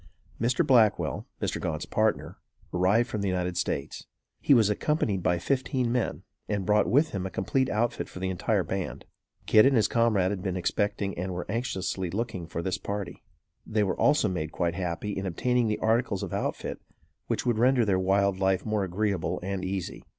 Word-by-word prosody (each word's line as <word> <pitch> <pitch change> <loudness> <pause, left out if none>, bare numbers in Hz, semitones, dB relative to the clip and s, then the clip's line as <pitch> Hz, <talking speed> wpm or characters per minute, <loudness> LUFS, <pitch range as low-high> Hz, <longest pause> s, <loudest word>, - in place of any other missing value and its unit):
Mr. 120 +2 +2
Blackwell, 105 - +3
Mr. - - -2
Gaunt's 75 -1 -2
partner, 110 0 0 0.4
arrived 95 +7 +3
from 110 -5 -3
the 100 - -1
United 90 -1 -1
States. 70 -5 -3 0.3
He 140 - +5
was 110 -4 +5
accompanied 105 - 0
by 90 0 +2
fifteen 130 +4 0
men, 125 -1 -1 0.3
and 100 -3 -1
brought 105 +2 +3
with 150 +5 +3
him 95 -1 -3
a - - -6
complete 130 +9 0
outfit 115 +3 -1
for - - -11
the 95 +1 -2
entire 90 - 0
band. - - -4 0.4
Kit 110 - +6
and 135 0 +4
his 110 - +4
comrade 110 -5 +2
had 100 -3 -3
been 95 -1 -2
expecting 100 +1 -1
and 90 +1 -3
were 90 - -4
anxiously 95 -5 -2
looking 95 -3 -3
for 85 0 -4
this 95 0 -2
party. 100 -2 -5 0.4
They 110 -1 0
were 95 - 0
also 150 -7 +4
made 80 -5 -3
quite 85 -2 -1
happy 90 +2 -3
in 95 0 -3
obtaining 125 +6 +1
the 105 - 0
articles 110 -3 +1
of - - -5
outfit - - -3 0.5
which - - -1
would 120 -3 +1
render 125 0 +4
their 95 -3 +2
wild 95 0 +2
life 95 -1 +1
more 110 -2 0
agreeable 95 0 -1
and 95 0 -3
easy. 95 -1 -4
100 Hz, 185 wpm, -27 LUFS, 95-115 Hz, 0.5 s, Kit